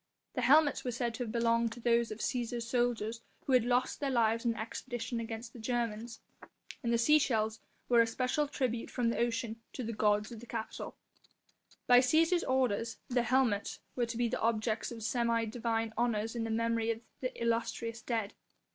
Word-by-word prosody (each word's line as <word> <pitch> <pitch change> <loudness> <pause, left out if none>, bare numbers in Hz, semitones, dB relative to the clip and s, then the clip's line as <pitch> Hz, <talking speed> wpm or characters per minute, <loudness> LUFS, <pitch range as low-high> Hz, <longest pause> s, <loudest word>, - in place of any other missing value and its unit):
The - - -1
helmets 290 0 +5
were 250 - -2
said 240 0 -2
to 245 - -3
have 225 - -5
belonged 230 0 +2
to 240 - -11
those 235 0 +2
of 215 - -5
Cæsar's 235 -1 -2
soldiers 235 -2 0 0.2
who 270 - +1
had 250 -3 +6
lost 245 +1 +1
their 280 - -1
lives 230 -2 +2
in 235 -1 +2
the - - -9
expedition 240 +1 -4
against 225 0 -6
the 240 - -10
Germans, 230 -1 -2 0.6
and 235 - -1
the 235 - +4
sea 300 +7 +5
shells 220 -5 0 0.3
were 240 -1 +6
a 230 - +3
special 255 +5 0
tribute 250 -5 -2
from 240 -2 0
the - - -2
ocean 230 -1 -1
to 255 - -4
the 230 0 -3
gods 210 +1 +2
of 230 - -7
the 240 - -12
Capitol. 225 -1 -5 0.9
By 245 - +7
the 250 - +3
Cæsar's 330 +5 +4
orders 240 -4 0
the 245 -1 +2
helmets 240 -4 +1 0.2
were 240 -2 0
to 230 0 -4
be 240 0 +2
the - - -2
objects 220 0 0
of 225 -2 -7
semi 230 0 +1
divine 225 0 -2
honours 225 -1 0
in 230 -1 -1
memory 230 0 0
of 225 0 -1 0.2
the 255 - -4
illustrious 230 0 -1
dead. 225 -3 -2
235 Hz, 195 wpm, -32 LUFS, 225-245 Hz, 0.9 s, By